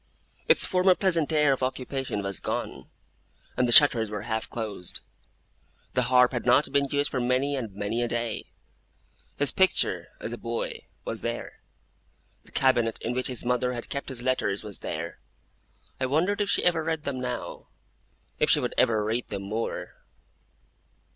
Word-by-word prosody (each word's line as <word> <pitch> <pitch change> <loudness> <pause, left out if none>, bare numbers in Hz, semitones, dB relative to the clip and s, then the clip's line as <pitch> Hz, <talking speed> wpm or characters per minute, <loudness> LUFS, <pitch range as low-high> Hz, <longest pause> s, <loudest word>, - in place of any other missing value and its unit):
Its - - +6
former 185 0 +4
pleasant 170 -6 +1
air 150 -3 +4
of 135 - -4
occupation 130 -3 -2
was 100 -2 -2
gone, - - -4 0.7
and 125 - +2
the - - +1
shutters 115 -5 +7
were 105 -1 -5
half 110 0 -3
closed. 105 -6 -4 0.9
The - - +2
harp 125 -1 +5
had 120 -2 -3
not 125 +4 +4
been 140 0 +3
used 145 +1 0
for 130 - -1
many 130 +3 +1
and 115 -6 -4
many 105 +4 -2
a 120 - +1
day. 120 0 -3 0.9
His 145 -1 +1
picture, 190 0 +3
as - - -5
a - - -6
boy, 485 -2 -4 0.2
was - - -3
there. - - -5 0.8
The - - -11
cabinet 120 -4 +2
in 120 - -1
which 125 +1 +1
his 125 -2 -3
mother 125 0 +1
had 120 - -6
kept 140 0 -4
his 125 -2 -5
letters 125 -6 0
was 105 -2 -6
there. 85 +2 -5 0.8
I 130 - 0
wondered 180 +10 +1
if 200 - 0
she - - +2
ever 170 -3 +2
read 160 -1 -2
them 135 -2 -3
now; 125 -1 -5 0.7
if - - +3
she - - +5
would - - -2
ever 110 -2 +3
read 115 +3 -1
them 100 -1 -5
more! 110 +4 -4
125 Hz, 170 wpm, -27 LUFS, 115-145 Hz, 0.9 s, shutters